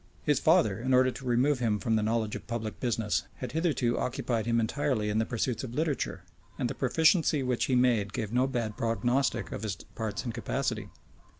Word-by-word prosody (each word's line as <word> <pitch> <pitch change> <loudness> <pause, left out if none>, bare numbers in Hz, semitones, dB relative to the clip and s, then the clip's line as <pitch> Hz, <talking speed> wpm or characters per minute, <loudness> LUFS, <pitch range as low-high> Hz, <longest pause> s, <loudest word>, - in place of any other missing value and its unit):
[*] - - -30
His 150 -2 +2
father, 155 - +3
in 130 +2 +2
order 130 0 +4
to 125 +2 -10
remove 125 +3 +2
him 110 -4 +1
from 110 +3 0
the 110 - +2
knowledge 110 0 0
of - - -8
public 115 -2 -4
business, 115 -4 0
had 125 -2 -6
hitherto 155 -7 +1
occupied 120 -2 -1
him 115 0 +2
entirely 115 -2 0
in 105 +1 +1
the 110 - 0
pursuits 120 0 -2
of 125 -2 -6
literature; 145 - -1 0.3
and 125 - 0
the - - -3
proficiency 160 +2 +3
which 125 -2 0
he 130 - +1
made 120 -5 +3
gave 110 +1 -4
no 125 +2 +3
bad 115 -5 -2
prognostic 120 +3 0
of - - -5
his 105 -4 -2
parts 105 +2 -5
and 120 - -3
capacity. 120 -1 -2
120 Hz, 205 wpm, -29 LUFS, 110-130 Hz, 0.3 s, order